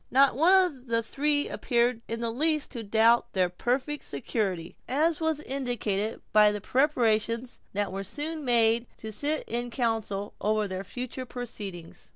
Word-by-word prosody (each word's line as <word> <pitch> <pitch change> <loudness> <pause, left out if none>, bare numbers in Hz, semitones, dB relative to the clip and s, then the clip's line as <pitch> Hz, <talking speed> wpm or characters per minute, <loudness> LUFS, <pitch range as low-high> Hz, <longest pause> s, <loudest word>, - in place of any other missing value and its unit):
Not 270 -1 +5
one 325 +7 +4
of 270 -7 -7
the 230 0 +1
three 290 +5 0
appeared 240 -1 0
in 230 +1 -4
the 230 -1 -1
least 305 +4 +1
to 240 - -5
doubt 225 +2 +3
their 185 -2 +2
perfect 255 - -2
security, 190 -8 -2
as 310 +5 +1
was 320 -2 0
indicated 240 -7 -2
by 210 -1 +7
the 210 - -3
preparations 235 -2 +1
that 205 -1 -1
were 195 +1 -3
soon 300 - -4
made 230 -1 +3
to 220 - -7
sit 295 +8 -1
in 240 +1 -2
council 225 -5 -1
over 215 0 +1
their 190 0 -4
future 250 +5 -6
proceedings. 205 -9 -7
235 Hz, 160 wpm, -28 LUFS, 215-275 Hz, -, by